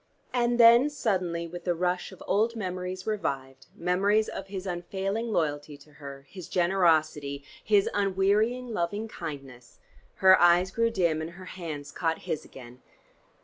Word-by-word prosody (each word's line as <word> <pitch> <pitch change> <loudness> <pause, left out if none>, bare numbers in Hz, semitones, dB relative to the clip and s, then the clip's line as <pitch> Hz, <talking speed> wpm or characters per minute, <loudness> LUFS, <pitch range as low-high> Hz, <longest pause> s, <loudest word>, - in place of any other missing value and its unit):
And 240 -1 +1
then 235 +4 +7
suddenly 185 -11 -1
with 175 +1 -8
the 175 -2 0
rush 180 +2 -1
of 190 - -12
old 225 +3 +1
memories 185 -2 -4
revived, 135 -11 -4
memories 200 +5 +1
of - - -7
his 195 -1 -6
unfailing 190 +5 -3
loyalty 145 -4 -2
to 145 +2 -19
her, 140 -1 -9
his 185 0 -10
generosity, 155 -6 +1 0.2
his 205 -2 +3
unwearying 205 +5 +1
loving 205 +4 -2
kindness, 135 - -9 0.4
her 190 0 +6
eyes 175 +1 +5
grew 230 +3 +1
dim, 170 -8 0
and 160 - -5
her 185 +1 -11
hands 155 -5 -7
caught 165 -1 -1
his 155 - -3
again. 125 -1 -13
180 Hz, 145 wpm, -27 LUFS, 155-205 Hz, 0.4 s, then